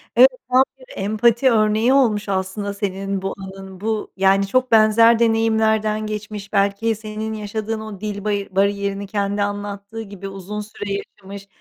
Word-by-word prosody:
Evet, 255 +3 +8 0.2
tam 255 +1 +6 0.2
bir 255 - -15
empati 230 +5 +2
örneği 220 +3 +3
olmuş 215 -7 +2
aslında 195 +1 -2
senin 195 -1 -3
bu 195 0 -3
anın. 190 0 -10
Bu 220 -1 -2
yani 195 +1 +3
çok 255 +4 +1
benzer 225 +1 +6
deneyimlerden 220 -1 +2
geçmiş, 210 -1 -6
belki 200 +3 +1
senin 215 0 -5
yaşadığın 215 +1 -4
o 215 -3 -8
dil 205 -2 -4
bari 205 -1 -1
bariyerini 200 0 0
kendi 200 0 -1
anlattığı 205 +2 -5
gibi 200 -2 -8
uzun 195 +2 -6
süre 205 -1 -7
yaşamış, 200 0 -8
210 Hz, 150 wpm, -21 LUFS, 200-220 Hz, 0.2 s, Evet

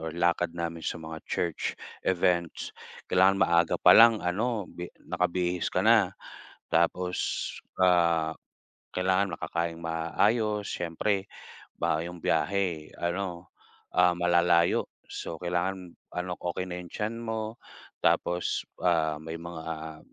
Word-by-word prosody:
or 80 +1 -5
lakad 85 0 +1
namin 85 -1 -3
sa 85 - -3
mga 80 -1 -8
church 85 -3 -2 0.3
events, 85 -2 +1 0.3
kailangan 95 +1 +4
maaga 85 -1 +3
pa - - +7
lang 115 -4 +7
ano 105 +4 0
bi 90 0 -8 0.2
nakabihis 90 0 0
ka - - 0
na. - - +4 0.6
Tapos, 90 +2 0 0.3
ah, 85 -3 +3 0.6
kailangan 95 0 +1
makakaing 85 +1 -3
maayos 105 +6 0
siyempre, 95 +4 -1 0.5
ba 80 - 0
'yung 85 +1 -6
biyahe 90 -6 0
ano, 85 0 -3 0.5
ah, 90 -1 +6
malalayo, 85 -1 +3 0.2
so - - -5
kailangan 90 0 -2 0.2
ano, 90 0 -3
okey 90 +1 -3
na 90 - -4
'yung 90 - -8
tiyan 110 +2 -2
mo, 110 0 -4 0.4
tapos, 90 0 +1 0.2
ah, 80 -3 +2
may 80 +1 -6
mga, 85 -1 -7
ah, 80 -1 -5
85 Hz, 120 wpm, -28 LUFS, 85-95 Hz, 0.6 s, pa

